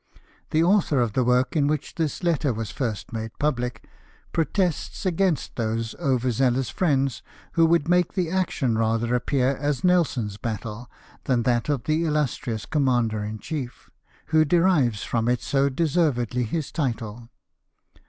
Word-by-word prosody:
The 160 +1 +2
author 175 -6 +3
of 120 -4 +1
the 130 - +2
work 125 +3 +2
in 145 -2 +3
which 150 -1 -2
this 160 +2 -2
letter 155 -5 +1
was 115 -2 -4
first 115 -4 -4
made 110 -1 -5
public 125 -5 -2 0.5
protests 175 +2 -1
against 185 -2 0
those 115 -1 -2
over 130 -2 +1
zealous 125 +1 +1
friends 135 -7 +1 0.3
"who 165 -1 +4
would 165 -2 +2
make 180 0 +2
the 180 -5 -1
action 160 -10 0
rather 115 +1 +1
apjDear 130 +1 +1
as 145 +2 -1
Nelson's 140 - +1
battle 110 +1 -5 0.4
than 125 -3 +1
that 120 +3 +1
of 140 -5 0
the 155 +2 +1
illustrious 140 - -1
commander 120 -7 +1
in 105 +1 -4
chief, 130 0 -6 0.4
who 155 0 +5
derives 155 - +2
from 115 0 0
it 125 -1 0
so 140 0 +2
deservedly 130 -6 +1
his 155 +6 -3
title. 115 -5 -3
135 Hz, 150 wpm, -24 LUFS, 120-160 Hz, 0.5 s, who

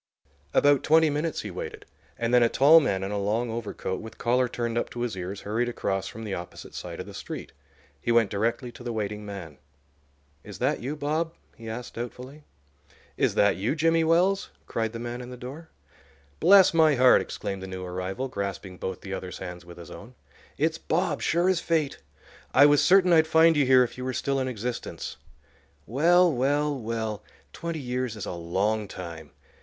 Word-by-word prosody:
About 145 - +4
twenty 160 0 +4
minutes 150 +2 -2
he 105 - -6
waited, 90 - -7 0.3
and 115 +1 -1
then 125 - +6
a 115 - +4
tall 150 +7 +7
man 95 -11 -1
in 95 - -3
a 105 - -1
long 110 +4 -1
overcoat, 110 -4 -4
with 110 - -10
collar 125 +1 +2
turned 115 -1 -3
up 120 - -1
to 120 - -6
his 120 -4 -2
ears, 95 +2 -5
hurried 115 +4 -1
across 95 -5 -2
from 110 - -8
the 105 -3 -4
opposite 90 -1 -8
side - - -7
of - - -5
the - - -11
street. - - -7 0.5
He 120 - 0
went 115 -3 +3
directly 115 +4 -1
to 120 - -12
the 120 - -3
waiting 105 -1 -4
man. 85 -8 -8 0.8
"Is - - -9
that - - 0
you, 135 +5 -4
Bob?" 155 +3 -2 0.2
he 115 -1 -9
asked, 120 +2 -6
doubtfully. 125 +5 -8 0.7
"Is - - +1
that 100 -1 +3
you, 105 +10 -1
Jimmy 165 +1 +3
Wells?" 180 +5 +2 0.2
cried 115 -1 -2
the 115 - -6
man 120 +1 -5
in 125 - -8
the 125 - -8
door. 140 +7 -9 0.7
"Bless 190 -1 +7
my 160 -3 +5
heart!" 130 0 +6
exclaimed 100 -2 -5
the 95 - -6
new 95 -1 -6
arrival, 95 +8 -4
grasping 100 -5 -5
both 95 -1 -4
the 95 - -6
other's 90 -1 -5
hands 90 -1 -8
with 85 0 -12
his 85 -2 -11
own. - - -11 0.4
"It's 160 +2 0
Bob, 165 -2 -1
sure 170 +2 +2
as 185 -2 +3
fate. 160 -5 0 0.6
I 140 - +8
was 145 0 +5
certain 185 -1 +5
I'd 160 -1 +5
find 160 +1 +5
you 145 -3 +3
here 130 -1 +7
if 125 - -5
you - - -4
were 130 - -2
still 135 +2 -1
in 130 - -1
existence. 120 0 -5 0.7
Well, 170 - +4
well, 145 +3 +1
well!—twenty 115 +7 -5
years 125 -3 -3
is 105 - -6
a - - -4
long 100 +5 -1
time. 85 -5 -8
120 Hz, 195 wpm, -26 LUFS, 100-150 Hz, 0.8 s, I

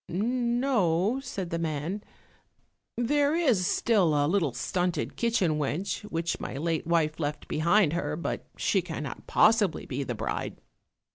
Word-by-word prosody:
"No," 235 -1 +1
said 195 -10 -5
the 170 - -1
man, 165 +5 -3 0.9
"There 285 +5 +2
is 250 - +2
still 190 -10 +2
a 145 0 +3
little 165 -3 +1
stunted 180 +7 -2
kitchen 190 -10 +1
wench 150 +7 -2
which 165 -4 -2
my - - -5
late 160 +1 -1
wife 165 -2 +1
left 150 -1 -3
behind 170 +1 +3
her, 150 -3 -1
but 165 - -4
she 195 - +2
cannot 160 -6 -6
possibly 215 -6 +3
be 130 +1 -3
the 125 -3 -4
bride." 110 +1 -4
175 Hz, 140 wpm, -28 LUFS, 155-215 Hz, 0.9 s, a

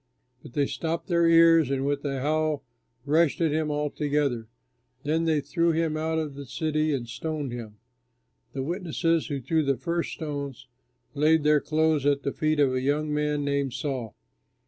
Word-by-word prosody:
But - - -13
they 145 -1 +2
stopped 165 +5 -3
their 170 -1 +3
ears 165 -3 +6
and 135 0 -1
with 140 0 -1
a 135 -2 -2
howl 155 0 0 0.4
rushed 155 +1 +2
at 165 -3 +2
him 155 0 0
all 150 0 -1
together. 140 -6 -1 0.6
Then 160 +3 0
they 155 -2 +2
threw 170 +3 +1
him 160 -1 0
out 160 +1 -1
of 155 -3 -2
the 140 -1 -9
city 155 +3 0
and 125 -4 -2
stoned 145 +2 -4
him. 115 -3 -7 0.8
The 135 - -3
witnesses 165 0 0
who 140 -2 -3
threw 160 +6 +1
the 140 -2 +1
first 170 +6 -2
stones, 140 -5 -5 0.5
laid 155 +1 +3
their 150 -1 +4
clothes 155 -2 +1
at 140 -1 +2
the 140 - -2
feet 155 -1 0
of 135 -3 +3
a 130 - 0
young 150 +3 0
man 150 -1 0
named 140 -2 0
Saul. 130 -7 -4
150 Hz, 180 wpm, -26 LUFS, 140-160 Hz, 0.8 s, ears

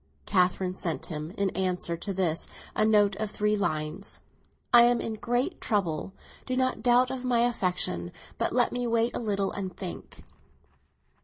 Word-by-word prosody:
Catherine 185 -1 +1
sent 170 -3 -3
him, 155 -1 -5
in 200 -1 +1
answer 180 -2 -1
to 195 +4 -5
this, 180 -4 0 0.3
a - - +2
note 210 -2 +4
of 215 -1 -2
three 210 +1 0
lines. 155 0 -3 0.5
"I 240 - +10
am 240 0 +3
in 225 - -3
great 245 - -1
trouble; 185 -5 -1 0.4
do 255 - -1
not 255 0 0
doubt 250 0 +4
of 260 -1 -4
my 245 -2 +2
affection, 180 - 0 0.3
but - - +1
let - - +3
me 245 0 -2
wait 230 0 +1
a - - -1
little 200 -4 -1
and 190 -2 -5
think." 180 -2 -8
200 Hz, 165 wpm, -28 LUFS, 180-235 Hz, 0.5 s, I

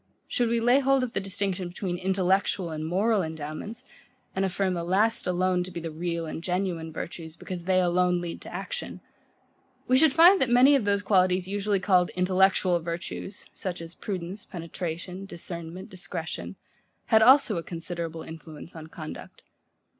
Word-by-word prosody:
Should 240 -2 0
we 235 0 +2
lay 245 +4 +5
hold 270 -1 +3
of 245 - -3
the - - 0
distinction 195 -1 -2
between 175 0 -4
INTELLECTUAL 190 -1 +1
and 155 0 -4
MORAL 205 +5 +2
endowments, 160 - -6 0.5
and 190 - +1
affirm 190 0 0
the 170 -1 -2
last 205 +6 +1
alone 180 0 +1
to 180 - -6
be 170 - -6
the 165 -1 -5
real 170 +1 -3
and 160 +1 -6
genuine 180 -3 -2
virtues, 160 0 -7
because 175 -2 -7
they 185 0 +3
alone 180 0 +2
lead 175 -1 -5
to - - -9
action; - - -5 0.9
we 255 +1 +5
should 315 -1 +6
find 345 +6 +7
that 260 - +2
many 250 +4 +7
of 255 -7 +1
those 200 0 +1
qualities, 185 -2 +3
usually 200 0 0
called 185 -2 +3
intellectual 185 -1 +3
virtues, 170 +3 -5
such 180 -2 -4
as 165 0 -8
prudence, 190 +1 -5
penetration, 175 +2 -6
discernment, 170 0 -7
discretion, 160 - -6 0.5
had 220 - +6
also 255 -3 +6
a 165 - -3
considerable 165 -1 -5
influence 160 +1 -10
on 160 -1 -8
conduct. 155 -1 -9
185 Hz, 165 wpm, -27 LUFS, 170-200 Hz, 0.9 s, find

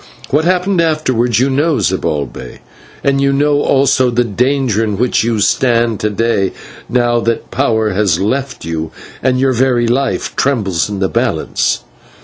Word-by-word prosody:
What 150 +3 +2
happened 185 0 +1
afterwards 130 -8 +1
you 135 +2 +2
know, 150 +2 +1
Zibalbay, 75 -6 -3 0.4
and 140 0 +1
you 140 0 +2
know 145 +1 +2
also 135 -2 +2
the 120 0 +1
danger 120 0 0
in 105 -3 -2
which 125 +1 +1
you 115 -1 0
stand 115 0 +1
to 105 - 0
day, 105 -3 0 0.4
now 120 -1 +2
that 115 0 -2
power 110 -5 +1
has 95 -3 +1
left 130 - -2
you, 80 -1 -3 0.3
and 130 -1 +1
your 135 0 +2
very 125 -1 +2
life 135 +3 -1
trembles 105 -11 0
in 100 -1 -4
the 95 - +2
balance." - - -1
120 Hz, 155 wpm, -15 LUFS, 105-135 Hz, 0.4 s, What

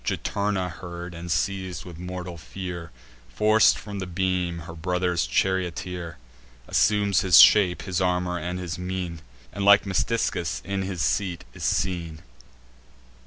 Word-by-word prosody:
Juturna 100 -2 -1
heard, 85 0 -8
and, 85 +1 -8
seiz'd 95 -2 -2
with 85 -2 -10
mortal 90 0 -6
fear, 85 0 -7 0.4
Forc'd 110 - +4
from 100 -2 -7
the 95 - -4
beam 90 -1 -1
her 85 - -8
brother's 90 +1 -1
charioteer; 90 -2 -1 0.5
Assumes 100 -3 +3
his 90 -3 +7
shape, 95 -4 +6
his 95 -1 -2
armour, 90 -1 0
and 90 +2 -4
his 90 -2 -5
mien, 90 -3 -4 0.3
And, 100 - -3
like 100 +1 +6
Metiscus, 100 -2 -1
in 100 -1 -2
his 95 -3 -3
seat 90 -5 -1
is - - -6
seen. 85 -4 -1
90 Hz, 135 wpm, -25 LUFS, 85-95 Hz, 0.5 s, his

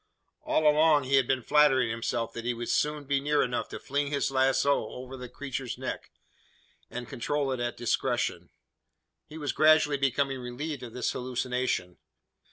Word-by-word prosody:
All 155 - +2
along 150 -1 +5
he 135 +1 +2
had 130 -2 +3
been 130 -2 0
flattering 135 -5 +4
himself 115 0 -2
that 115 - -6
he 120 0 -1
would 120 0 -5
soon 150 0 0
be 140 0 +1
near 145 +1 +2
enough 125 -1 -2
to - - -6
fling 140 +1 -2
his 140 -1 -1
lazo 135 -1 +2
over 130 +1 -8
the 125 -1 -8
creature's 135 -3 -5
neck, - - -5 0.8
and 120 0 -6
control 140 +3 -1
it 130 - -2
at 120 0 -2
discretion. 120 - -1 0.8
He 155 - -10
was 145 -2 -2
gradually 155 -2 +5
becoming 135 0 0
relieved 140 +4 -5
of 120 -2 -8
this 125 - -1
hallucination. 125 -7 -2
135 Hz, 170 wpm, -28 LUFS, 125-145 Hz, 0.8 s, along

